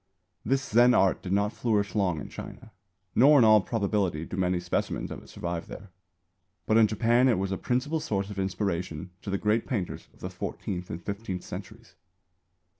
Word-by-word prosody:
This 135 Hz, 0 st, +1 dB
Zen 120 Hz, +3 st, +5 dB
art 95 Hz, -1 st, +3 dB
did 90 Hz, -, -6 dB
not 100 Hz, +2 st, +1 dB
flourish 105 Hz, -4 st, 0 dB
long 95 Hz, -7 st, +1 dB
in -, -, -7 dB
China, 115 Hz, -2 st, -10 dB, 0.4 s
nor 145 Hz, +5 st, +6 dB
in 120 Hz, -, +6 dB
all 110 Hz, -1 st, +7 dB
probability 100 Hz, -7 st, -1 dB
do 90 Hz, -, -6 dB
many 90 Hz, -1 st, +1 dB
specimens 90 Hz, 0 st, -2 dB
of -, -, -6 dB
it -, -, -17 dB
survive 85 Hz, -1 st, -4 dB
there. 100 Hz, -1 st, -10 dB, 0.7 s
But 110 Hz, -, +3 dB
in 110 Hz, -1 st, +6 dB
Japan 120 Hz, +4 st, +3 dB
it 120 Hz, -, +3 dB
was 95 Hz, +1 st, -2 dB
a -, -, 0 dB
principal 140 Hz, +6 st, 0 dB
source 105 Hz, -10 st, -2 dB
of 100 Hz, -, -6 dB
inspiration 90 Hz, -3 st, -2 dB
to -, -, -7 dB
the 100 Hz, -, 0 dB
great 105 Hz, +3 st, +1 dB
painters 105 Hz, -10 st, -3 dB
of -, -, -24 dB
the -, -, -5 dB
fourteenth 90 Hz, -2 st, -5 dB
and 85 Hz, -, -5 dB
fifteenth 100 Hz, -3 st, -4 dB
centuries. -, -, -9 dB
100 Hz, 190 wpm, -28 LUFS, 90-115 Hz, 0.7 s, all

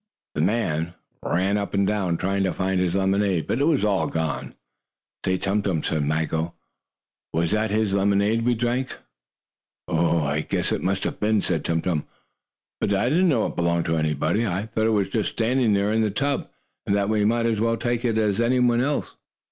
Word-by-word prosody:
The 75 Hz, -, -1 dB
man 85 Hz, -4 st, 0 dB, 0.3 s
ran 95 Hz, +4 st, +1 dB
up 100 Hz, 0 st, -4 dB
and 100 Hz, 0 st, +3 dB
down, 95 Hz, -5 st, 0 dB
trying 100 Hz, +3 st, 0 dB
to 95 Hz, -, 0 dB
find 95 Hz, 0 st, 0 dB
his 90 Hz, -1 st, 0 dB
lemonade, 95 Hz, -2 st, +1 dB
but 120 Hz, -, -1 dB
it -, -, +4 dB
was 150 Hz, -8 st, +2 dB
all 100 Hz, -2 st, +1 dB
gone. 80 Hz, -3 st, -3 dB, 0.7 s
"Say, 95 Hz, 0 st, +1 dB
Tum 100 Hz, +3 st, 0 dB
Tum," 90 Hz, -6 st, -1 dB
said 80 Hz, -, 0 dB
Maggo, 80 Hz, +2 st, -1 dB, 0.8 s
"was 85 Hz, +1 st, 0 dB
that 110 Hz, +1 st, +1 dB
his 105 Hz, -1 st, +1 dB
lemonade 100 Hz, +3 st, +2 dB
we 120 Hz, 0 st, +2 dB
drank?" 120 Hz, +3 st, -1 dB, 0.9 s
"I 90 Hz, -, -5 dB
I 80 Hz, -3 st, +1 dB
guess -, -, -2 dB
it -, -, -1 dB
must 95 Hz, +1 st, -1 dB
have -, -, -3 dB
been," 105 Hz, 0 st, +2 dB
said 80 Hz, -4 st, -1 dB
Tum 80 Hz, -1 st, -1 dB
Tum. 80 Hz, -5 st, -1 dB, 0.7 s
"But 100 Hz, -, 0 dB
I 120 Hz, +5 st, +1 dB
didn't 175 Hz, +5 st, +3 dB
know 120 Hz, -8 st, +2 dB
it -, -, -4 dB
belonged 85 Hz, -1 st, +1 dB
to 80 Hz, -, 0 dB
anybody. 80 Hz, +7 st, 0 dB
I 100 Hz, -1 st, -1 dB
thought 110 Hz, 0 st, 0 dB
it -, -, +3 dB
was 100 Hz, -3 st, +1 dB
just 110 Hz, +1 st, 0 dB
standing 120 Hz, -1 st, +2 dB
there 100 Hz, +1 st, +1 dB
in 110 Hz, -, +2 dB
the 110 Hz, -, +2 dB
tub, 140 Hz, +7 st, -1 dB, 0.4 s
and 100 Hz, -, +2 dB
that 100 Hz, -1 st, +1 dB
we 105 Hz, -1 st, +1 dB
might 115 Hz, +2 st, +2 dB
as 115 Hz, -2 st, +1 dB
well 115 Hz, +1 st, +1 dB
take 120 Hz, 0 st, -1 dB
it 115 Hz, -3 st, +1 dB
as 105 Hz, -1 st, +1 dB
anyone 120 Hz, 0 st, +3 dB
else." 145 Hz, +2 st, -2 dB
100 Hz, 205 wpm, -24 LUFS, 85-115 Hz, 0.9 s, it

